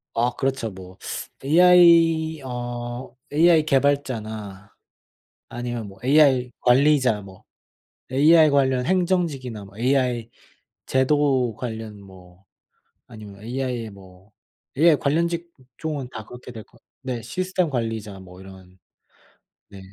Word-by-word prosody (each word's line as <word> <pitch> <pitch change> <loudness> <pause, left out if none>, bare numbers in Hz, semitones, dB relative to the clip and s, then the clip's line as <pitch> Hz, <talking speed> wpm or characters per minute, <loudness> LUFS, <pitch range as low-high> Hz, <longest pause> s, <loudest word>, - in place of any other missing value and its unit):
아 120 +2 +1
그렇죠. 135 -4 -2
뭐 95 0 -12 0.5
ai 165 -1 +5
어 120 0 -6 0.2
ai 160 +1 +4
개발자나 110 -9 -2 0.8
아니면 120 -2 -5
뭐 95 0 -14
ai 130 -2 +4
관리자 130 -3 +3
뭐 95 -2 -14 0.7
ai 155 +4 +5
관련 130 -3 +1
행정직이나 165 - -1
뭐 100 +1 -16
ai 125 -2 0 0.6
제도 130 -3 +1
관련 110 -3 -7
뭐 95 -1 -17 0.6
아니면 105 -3 -12
ai의 125 -1 -4
뭐 95 0 -17 0.5
ai 160 0 +5
관련 155 +5 0
직종은 155 -4 -6
다 110 -3 -8
그렇게 125 +2 -12
될 110 -2 -9
거 - - -24 0.2
네. 130 -3 -4
시스템 180 - -2
관리자 115 -6 -4
뭐 90 0 -14
이런 95 -1 -15 0.9
네. 100 - -12
125 Hz, 215 characters per minute, -23 LUFS, 110-145 Hz, 0.9 s, ai